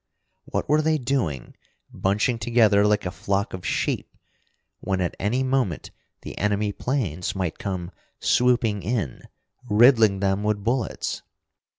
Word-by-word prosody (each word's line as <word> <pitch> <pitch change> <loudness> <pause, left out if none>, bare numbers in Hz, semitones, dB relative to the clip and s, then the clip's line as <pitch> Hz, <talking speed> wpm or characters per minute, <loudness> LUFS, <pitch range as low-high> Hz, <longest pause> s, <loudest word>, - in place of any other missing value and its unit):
What - - -3
were 150 +2 +3
they 155 0 +2
doing, 120 - -2 0.4
bunching 105 +5 0
together 110 -4 +4
like 105 -2 +1
a 90 - -2
flock 100 +2 -2
of 95 -1 -6
sheep, - - -1 0.7
when 95 -1 -2
at 90 -2 -1
any 120 +6 0
moment 130 - -1 0.3
the - - -7
enemy 105 0 0
planes 100 - -2
might 90 -1 -3
come 95 -6 -4 0.3
swooping 120 -4 +2
in, 95 - -2 0.5
riddling 110 -2 +5
them 95 0 +1
with 105 -1 -1
bullets? 120 +1 -2
105 Hz, 130 wpm, -24 LUFS, 95-125 Hz, 0.7 s, riddling